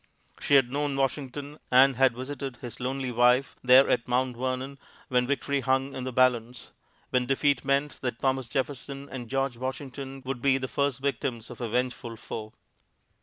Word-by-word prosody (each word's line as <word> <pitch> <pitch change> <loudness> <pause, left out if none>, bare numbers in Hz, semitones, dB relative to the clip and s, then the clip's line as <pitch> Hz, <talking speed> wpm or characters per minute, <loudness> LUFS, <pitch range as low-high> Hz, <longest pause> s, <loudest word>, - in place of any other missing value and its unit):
She 145 - +3
had 130 -3 +5
known 145 0 -1
Washington, 140 +2 -3
and 130 +1 +6
had 130 -1 +4
visited 135 0 -5
his 120 -1 -8
lonely 130 0 -2
wife 125 +2 +3
there 130 +2 +7
at 115 - +1
Mount 125 0 +1
Vernon 130 +2 -3 0.3
when 125 -1 +2
victory 140 0 0
hung 135 +1 +1
in 130 - -5
the 130 - -3
balance; 125 -1 +1 0.4
when 125 -1 +1
defeat 135 0 +2
meant 140 +1 0
that 125 -3 -2
Thomas 130 -1 0
Jefferson 140 +1 -3
and 120 -3 -6
George 135 -2 -1
Washington 135 +1 -6
would 130 -2 -4
be 135 0 +4
the 130 -1 -3
first 140 -1 -1
victims 130 -4 -2
of - - -10
a 120 - -2
vengeful 125 0 -2
foe. 110 0 -7
130 Hz, 170 wpm, -27 LUFS, 125-135 Hz, 0.4 s, there